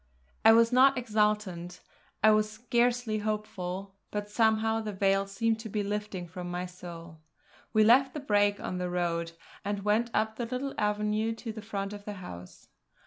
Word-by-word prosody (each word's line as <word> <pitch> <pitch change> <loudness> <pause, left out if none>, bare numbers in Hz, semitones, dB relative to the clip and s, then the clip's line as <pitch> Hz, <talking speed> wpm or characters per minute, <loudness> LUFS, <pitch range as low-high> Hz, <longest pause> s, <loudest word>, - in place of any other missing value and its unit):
I 220 - +9
was 230 +1 +5
not 265 +2 +6
exultant, 210 -6 0 0.4
I 215 - +8
was 215 0 +3
scarcely 235 0 0
hopeful; 200 -3 -4 0.2
but 210 0 -4
somehow 220 0 +2
the 215 -1 -4
veil 195 0 +2
seemed 225 +3 0
to 220 0 -7
be 210 0 -1
lifting 205 -3 -4
from 175 +1 -7
my 180 +1 -3
soul. 170 -2 -10 0.5
We 215 -1 +4
left 260 +5 +5
the - - -2
brake 205 -6 +2
on 180 - -4
the 180 0 -2
road, 170 -1 -1 0.3
and 205 0 -3
went 220 +3 +2
up 220 0 0
the 240 - -3
little 260 +3 -3
avenue 210 +1 0
to 225 0 -6
the 220 - -7
front 200 -2 -4
of 205 0 -9
the 210 - -4
house. 90 - -10
210 Hz, 175 wpm, -29 LUFS, 195-225 Hz, 0.5 s, I